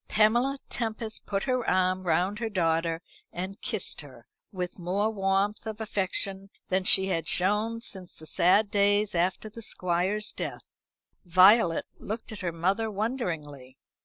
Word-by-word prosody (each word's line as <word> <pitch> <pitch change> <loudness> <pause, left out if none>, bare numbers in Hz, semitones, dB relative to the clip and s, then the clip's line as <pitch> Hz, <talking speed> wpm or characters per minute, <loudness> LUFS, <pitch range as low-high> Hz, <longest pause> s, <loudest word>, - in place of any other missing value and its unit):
Pamela 240 +6 +3
Tempest 225 -1 -4
put 195 -1 -1
her 255 -2 0
arm 185 0 +1
round 180 +5 +1
her 230 -1 -2
daughter, 165 -3 0 0.3
and 190 +4 -6
kissed 215 -9 -2
her, 130 -5 -14 0.3
with 180 -1 -5
more 195 +5 0
warmth 195 +1 0
of 220 -1 -5
affection 195 -2 -2 0.2
than 185 0 +1
she 190 0 +7
had 165 -3 -1
shown 210 +5 +1
since 190 -6 -5
the 155 - -11
sad 200 +6 +3
days 205 +1 +2
after 180 +4 0
the 220 +2 -10
Squire's 190 +2 0
death. - - -7 0.4
Violet 185 0 +5
looked 220 +2 -6
at 215 - -7
her 180 -3 -2
mother 190 +7 0
wonderingly. 165 - -4
195 Hz, 145 wpm, -28 LUFS, 175-215 Hz, 0.4 s, she